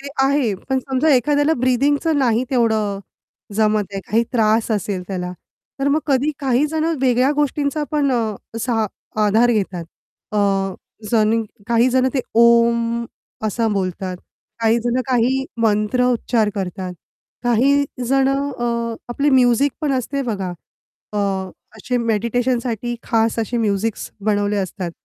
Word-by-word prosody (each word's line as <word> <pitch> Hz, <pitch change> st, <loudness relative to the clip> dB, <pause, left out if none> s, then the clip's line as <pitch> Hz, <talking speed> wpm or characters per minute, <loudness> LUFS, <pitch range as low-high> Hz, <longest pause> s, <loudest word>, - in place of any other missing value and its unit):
ते 280 Hz, -, -7 dB, 0.2 s
आहे 270 Hz, -6 st, +2 dB
पण 265 Hz, -1 st, +2 dB
समजा 265 Hz, +4 st, 0 dB
एखाद्याला 290 Hz, +4 st, +2 dB
ब्रीथिंगचं 285 Hz, +5 st, +2 dB
नाही 245 Hz, -2 st, +2 dB
तेवढं 220 Hz, -5 st, +1 dB, 0.6 s
जमत 215 Hz, 0 st, +2 dB
आहे 195 Hz, -, -3 dB
काही 225 Hz, +3 st, +3 dB
त्रास 220 Hz, -1 st, +2 dB
असेल 200 Hz, -3 st, -1 dB
त्याला. 180 Hz, -2 st, -3 dB, 0.5 s
तर 280 Hz, -, +2 dB
मग 300 Hz, +2 st, +2 dB
कधी 280 Hz, +1 st, +2 dB
काही 270 Hz, +1 st, +2 dB
जणं 320 Hz, +2 st, -1 dB
वेगळ्या 255 Hz, +1 st, +3 dB
गोष्टींचा 295 Hz, 0 st, 0 dB
पण 290 Hz, -2 st, +1 dB
अ, 225 Hz, -4 st, 0 dB, 0.2 s
असा 230 Hz, -2 st, 0 dB, 0.4 s
आधार 225 Hz, +4 st, +4 dB
घेतात. 190 Hz, -5 st, -2 dB, 0.5 s
अ, 210 Hz, -, +1 dB, 0.7 s
जणिव 225 Hz, 0 st, +3 dB, 0.2 s
काही 235 Hz, +1 st, +3 dB
जणं 260 Hz, +1 st, +3 dB
ते 265 Hz, -, +2 dB, 0.2 s
ओम 235 Hz, 0 st, +4 dB, 0.4 s
असा 225 Hz, +2 st, 0 dB
बोलतात, 185 Hz, -2 st, -2 dB, 0.4 s
काही 225 Hz, +1 st, +3 dB
जणं 245 Hz, +1 st, +1 dB
काही 260 Hz, +1 st, +1 dB, 0.2 s
मंत्र 215 Hz, +3 st, +2 dB
उच्चार 230 Hz, -2 st, +1 dB
करतात, 185 Hz, -1 st, -4 dB, 0.5 s
काही 265 Hz, +4 st, +3 dB, 0.2 s
जणं 275 Hz, +1 st, +2 dB
अ, 235 Hz, -1 st, -1 dB
आपली 280 Hz, +4 st, +1 dB
म्युझिक 255 Hz, +1 st, +4 dB
पण 300 Hz, -3 st, 0 dB
असते 270 Hz, +2 st, -1 dB
बघा, 195 Hz, -7 st, -3 dB, 0.6 s
अ, -, -, -4 dB, 0.6 s
असे 245 Hz, +4 st, -2 dB
मेडिटेशनसाठी 235 Hz, +1 st, -1 dB
खास 225 Hz, 0 st, +1 dB
असे 230 Hz, +2 st, -1 dB
म्युझिक्स 215 Hz, 0 st, -1 dB
बनवले 205 Hz, -1 st, +1 dB
असतात, 190 Hz, -2 st, -3 dB
235 Hz, 135 wpm, -20 LUFS, 215-265 Hz, 0.7 s, आधार